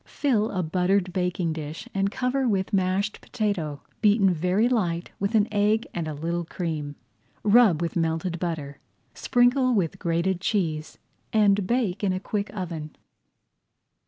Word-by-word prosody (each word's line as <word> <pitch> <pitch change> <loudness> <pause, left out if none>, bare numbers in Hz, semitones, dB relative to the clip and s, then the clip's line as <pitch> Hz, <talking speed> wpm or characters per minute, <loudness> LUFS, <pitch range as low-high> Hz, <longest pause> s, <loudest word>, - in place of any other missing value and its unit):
Fill 230 -7 +1
a 185 -2 -2
buttered 180 +2 +1
baking 180 -2 -1
dish 155 0 -6
and 195 0 +1
cover 250 +5 -1
[Page 260 -2 +1
111] - - +2
with 190 -1 -1
mashed 195 +2 0
potato, 185 - -2 0.2
beaten 205 -3 +4
very 180 +7 +2
light 180 -8 -1
with 200 +3 -1
an 215 -1 +4
egg 210 +2 +2
and 170 -2 -3
a 155 - -3
little 170 +3 -2
cream. 155 -4 -4 0.5
Rub 205 -6 +5
with 170 - -3
melted 165 +1 -1
butter, 155 -5 -4 0.3
sprinkle 250 0 +3
with 180 -6 0
grated 170 +2 0
cheese, 160 -7 -1 0.3
and 205 -4 +3
bake 220 -5 0
in 190 -2 +2
a 185 - -2
quick 205 +2 -3
oven. 165 -6 -6
185 Hz, 155 wpm, -25 LUFS, 165-210 Hz, 0.5 s, Rub